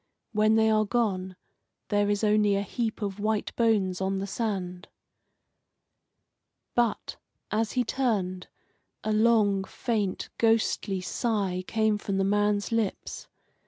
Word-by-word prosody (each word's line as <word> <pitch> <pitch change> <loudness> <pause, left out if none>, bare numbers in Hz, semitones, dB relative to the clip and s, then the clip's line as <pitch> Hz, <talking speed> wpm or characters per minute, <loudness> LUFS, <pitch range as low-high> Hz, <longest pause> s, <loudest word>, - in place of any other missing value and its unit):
When 215 0 +3
they 220 0 +4
are 215 0 +3
gone 200 -5 -1 0.5
there 205 0 +2
is 205 +1 0
only 210 -1 +3
a 200 - 0
heap 225 +1 -3
of 200 0 -3
white 215 0 -1
bones 200 -6 +1
on 190 +1 0
the 195 - -2
sand. 190 -4 -3 1.9
But, 240 -2 0 0.3
as 215 0 0
he 250 - +2
turned, 200 -8 -1 0.6
a 215 - 0
long, 215 -3 +3
faint, 205 -1 -2
ghostly 225 -4 +1
sigh 195 -3 -1
came 220 -1 +1
from 200 -1 -2
the 195 - +2
man's 205 +2 +1
lips. 225 -4 -2
210 Hz, 125 wpm, -27 LUFS, 195-225 Hz, 1.9 s, they